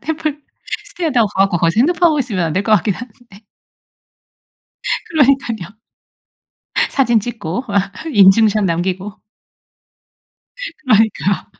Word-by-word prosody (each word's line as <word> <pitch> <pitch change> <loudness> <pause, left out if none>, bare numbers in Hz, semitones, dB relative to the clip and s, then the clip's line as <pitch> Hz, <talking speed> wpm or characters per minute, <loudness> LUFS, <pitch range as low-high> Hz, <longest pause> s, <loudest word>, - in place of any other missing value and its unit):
템플스테이라고 310 - -3
가 195 -1 +1
갖고 195 -3 +1
거기서 165 0 +1
핸드폰 345 +5 +3
하고 305 -2 0
있으면 215 -9 -1
안 160 - -3
될 185 +5 0
것 220 - 0
같긴 205 -1 +2
한데. 225 -1 -13 1.7
그러니깐요. 265 - +1 1.2
사진 240 -5 +2
찍고 220 -1 -5
막 200 0 0 0.2
인증샷 210 +1 +5
남기고. 185 +3 -2 1.7
그러니까. 220 -6 +1
220 Hz, 250 characters per minute, -17 LUFS, 195-270 Hz, 1.7 s, 인증샷